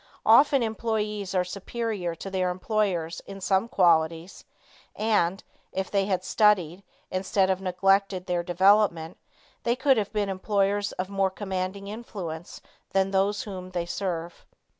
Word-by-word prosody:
Often 270 +3 +6
employees 215 -3 -2
are 180 - +3
superior 200 -1 -4
to 195 +4 -8
their 185 -1 0
employers 180 -3 -1
in 195 0 -8
some 190 +3 +1
qualities, 170 -3 +2 0.5
and, 200 -4 +1 0.3
if 190 0 -3
they 195 -1 +2
had 185 -2 0
studied, 190 -5 +2 0.3
instead 190 +1 +1
of 190 0 -1
neglected 195 0 +1
their 175 -1 0
development, 180 -1 +3 0.4
they 235 0 +1
could 265 0 +3
have 205 -2 -1
been 210 -2 0
employers 200 +1 0
of 185 +1 -4
more 195 -1 +1
commanding 190 0 -4
influence 190 -7 -7 0.3
than 195 0 +2
those 195 +1 +1
whom 185 -3 -7
they 175 -2 -3
serve. 175 -2 -4
195 Hz, 140 wpm, -26 LUFS, 180-205 Hz, 0.5 s, Often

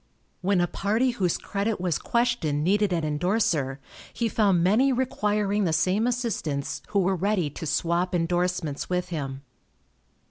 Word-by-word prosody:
When 190 -1 +2
a - - +3
party 220 +8 0
whose 190 -8 0
credit 205 +1 -2
was 175 -3 0
questioned 235 -12 0
needed 205 +3 +2
an 170 -2 0
indorser, 155 -3 0 0.3
he 235 - -1
found 195 -6 +2
many 225 +9 +4
requiring 210 -5 0
the 165 - +1
same 185 +8 +2
assistance 220 - -2
who 205 - -2
were 190 +1 +1
ready 185 -4 0
to 160 - -6
swap 175 +4 0
indorsements 175 -3 -1
with 180 0 -1
him. 140 -5 -4
185 Hz, 145 wpm, -26 LUFS, 165-210 Hz, 0.3 s, many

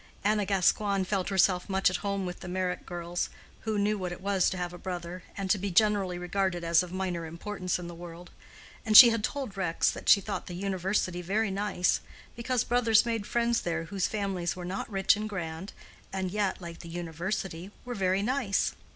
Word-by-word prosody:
Anna 210 -1 +2
Gascoigne 195 0 +2
felt 190 0 -1
herself 190 -1 +2
much 190 0 +2
at - - -1
home 200 -2 -2
with 180 0 -5
the - - -8
Meyrick 180 0 -2
girls, 175 0 -3 0.3
who 220 -1 -2
knew 205 +1 +1
what 180 -1 -3
it 175 - -6
was 195 -1 +2
to 185 - -4
have 175 -1 -3
a 175 - -9
brother, 180 -1 -5 0.2
and 195 -1 -2
to 205 - +3
be 200 +2 -2
generally 195 -1 +2
regarded 180 0 -1
as 170 0 +4
of 180 -1 -6
minor 180 -3 -3
importance 180 +3 -3
in 180 - -7
the 175 - -7
world; 175 +1 -10 0.5
and 215 -2 +6
she 240 -3 +12
had 225 -2 -1
told 265 -7 -3
Rex 180 -4 +1
that - - -4
she 200 - +8
thought 195 - -5
the 175 - -6
University 185 -1 -1
very 200 +4 0
nice, 195 -2 +1 0.3
because 240 +1 0
brothers 230 -2 +4
made 225 -3 -2
friends 235 0 +1
there 165 -1 -2
whose 185 +2 -1
families 195 -5 -2
were 180 -1 -7
not 185 +2 -4
rich 195 -2 +3
and 215 +1 -4
grand, 175 -1 -5 0.4
and 190 -1 -2
yet 205 -1 0
(like 170 -2 -8
the 170 - -10
University) 175 +2 -4 0.2
were 245 - -4
very 190 -2 +1
nice. 245 -4 0
190 Hz, 205 wpm, -29 LUFS, 175-205 Hz, 0.5 s, she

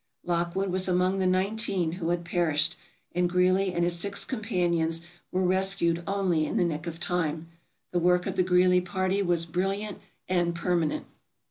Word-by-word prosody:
Lockwood 175 +2 -1
was 185 +1 -1
among 185 +1 +1
the 185 - +2
nineteen 190 -2 +1
who 170 -1 -3
had 175 0 -1
perished, 160 -2 +1 0.4
and 180 0 +1
Greely 185 +2 +2
and 175 -1 0
his 175 0 +1
six 200 +2 -1
companions 175 -8 0 0.3
were 185 +1 0
rescued 185 -2 +2
only 185 -6 +1
in - - -2
the 180 - +3
nick 160 0 -3
of 165 0 -6
time. 165 -2 -1 0.4
The 175 - +1
work 180 +1 +3
of - - -3
the - - +2
Greely 180 0 +4
party 185 +1 -1
was 175 -3 +1
brilliant 195 +5 -2 0.3
and 175 -2 +1
permanent. 170 -3 0
180 Hz, 165 wpm, -27 LUFS, 170-185 Hz, 0.4 s, Greely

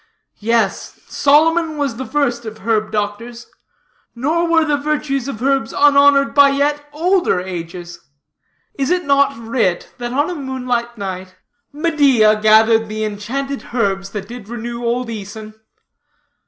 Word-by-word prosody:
Yes, 220 -2 -1
Solomon 315 +2 +2
was 275 -5 -2
the 260 - -5
first 245 -5 -1
of 220 -1 -8
herb 220 -2 0
doctors. 220 +3 -4 0.7
Nor 315 +8 0
were 325 -1 +3
the 300 -1 +1
virtues 285 -2 -2
of 245 -4 -6
herbs 270 -4 0
unhonored 280 -1 +4
by 285 -1 +6
yet 290 +1 -1
older 345 - +1
ages. 175 -1 -7 0.8
Is 270 - 0
it 360 0 0
not 280 -1 +2
writ, 225 -6 -2
that 240 0 -4
on 290 +4 +1
a 360 - -3
moonlight 250 -5 -3
night, 185 -2 -6 0.4
"Medea 280 -9 +3
gathered 220 +1 +4
the 215 0 -3
enchanted 260 +7 -4
herbs 195 -4 0
That 195 -1 -6
did 235 -2 -10
renew 235 0 -6
old 240 +1 -1
Æson?" 215 0 -8
240 Hz, 140 wpm, -18 LUFS, 215-285 Hz, 0.8 s, by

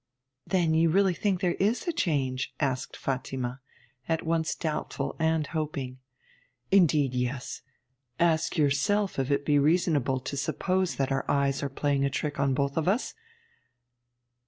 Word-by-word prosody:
'Then 175 -4 +2
you 165 +1 +4
really 190 +2 +3
think 190 +1 -1
there 180 -3 +2
is 215 - +1
a - - +2
change?' 130 - -1
asked 130 -3 -2
Fatima, 130 -1 -3 0.5
at 165 0 0
once 160 -1 0
doubtful 155 -3 -3
and 160 -1 +2
hoping. 140 -5 -3 0.7
'Indeed, 155 -8 +4
yes. 125 +1 -3 0.6
Ask 170 0 +2
yourself 185 +7 +1
if 135 0 -1
it 140 0 +1
be 145 -1 +4
reasonable 150 -4 +2
to 130 - -5
suppose 185 +6 0
that 135 0 -1
our 135 - 0
eyes 140 -1 +1
are 140 - -2
playing 140 0 0
a 140 - +2
trick 145 +1 -3
on 135 -1 +2
both 140 +1 -1
of 160 - 0
us? 210 +7 +1
150 Hz, 150 wpm, -28 LUFS, 135-170 Hz, 0.7 s, you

